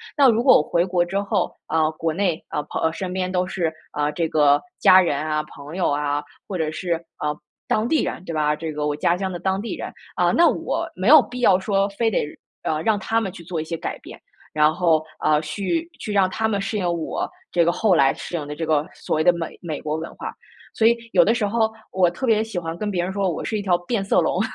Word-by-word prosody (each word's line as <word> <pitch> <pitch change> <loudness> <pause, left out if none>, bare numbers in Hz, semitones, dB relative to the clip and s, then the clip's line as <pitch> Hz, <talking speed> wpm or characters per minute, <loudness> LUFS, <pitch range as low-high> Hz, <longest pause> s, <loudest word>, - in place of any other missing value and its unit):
那 280 -4 +6
如 230 0 +3
果 260 - +7
我 - - +1
回 170 +3 +1
国 180 -1 +1
之 185 +3 -2
后 200 -2 -1
啊， 160 -1 +1
国 160 0 -2
内 175 -2 0
啊， 150 - -2
朋 145 - -5
啊， - - +1
呃， 160 - +1
身 185 +1 -4
边 185 0 -2
都 180 0 0
是， 175 -3 -2 0.2
啊， 150 0 0
这 165 +2 -1
个 145 -2 +4 0.2
家 185 0 +7
人 165 -6 0
啊、 155 0 -1
朋 145 +3 -11
友 185 - +1
啊， 145 0 -1 0.2
或 190 - -3
者 160 -2 -1
是， 175 +2 -2 0.3
呃， 150 0 -1 0.3
当 215 +2 +1
地 315 - +2
人 - - -4
对 165 - -5
吧？ 150 -1 +1
这 160 0 -5
个 150 0 -2
我 145 - -1
家 170 +3 +2
乡 190 +1 -3
的 175 - -4
当 190 +1 -1
地 225 - -4
人。 - - -6 0.2
啊， - - +3
那 340 - +5
我 - - -2
没 185 +3 -2
有 300 +2 +9
必 250 0 -7
要 195 -6 +5
说 195 0 +1
非 225 +3 0
得， 210 - 0 0.4
呃， 155 0 -1
让 215 +4 +2
他 225 +3 0
们 195 -4 -3
去 175 -2 -11
做 165 -1 -3
一 - - -3
些 165 +1 -4
改 - - -4
变， - - -12 0.3
然 150 0 +4
后， 160 -2 +2 0.2
呃， 150 0 +4
去 200 - -2
去 215 - -5
让 195 -2 +3
他 220 +3 -1
们 205 -2 0
适 200 +2 -2
应 190 - -1
我 165 -2 -3 0.2
这 175 - +3
个 170 - +3
后 190 +3 +2
来 135 -4 +5
适 - - -6
应 150 -4 -3
的 150 - -5
这 165 - -3
个 155 -1 +1
所 - - -2
谓 155 - +2
的 175 - +6
美 170 -2 -5
美 160 -4 -4
国 150 0 -3
文 160 +1 -6
化。 - - -6 0.4
所 225 - +3
以 235 - +4 0.2
有 - - +7
的 225 - +3
时 230 -3 0
候 220 +1 +1 0.2
我 185 -2 +3
特 175 +10 -4
别 220 -3 +3
喜 225 -4 -6
欢 165 -1 -3
跟 210 +4 -3
别 180 -4 -1
人 185 +2 -3
说， 195 -1 0
我 165 - -4
是 220 - -2
一 - - -3
条 185 -3 +2
变 195 +3 -2
色 195 - +2
龙， 175 +2 +1
175 Hz, 285 characters per minute, -22 LUFS, 155-200 Hz, 0.4 s, 有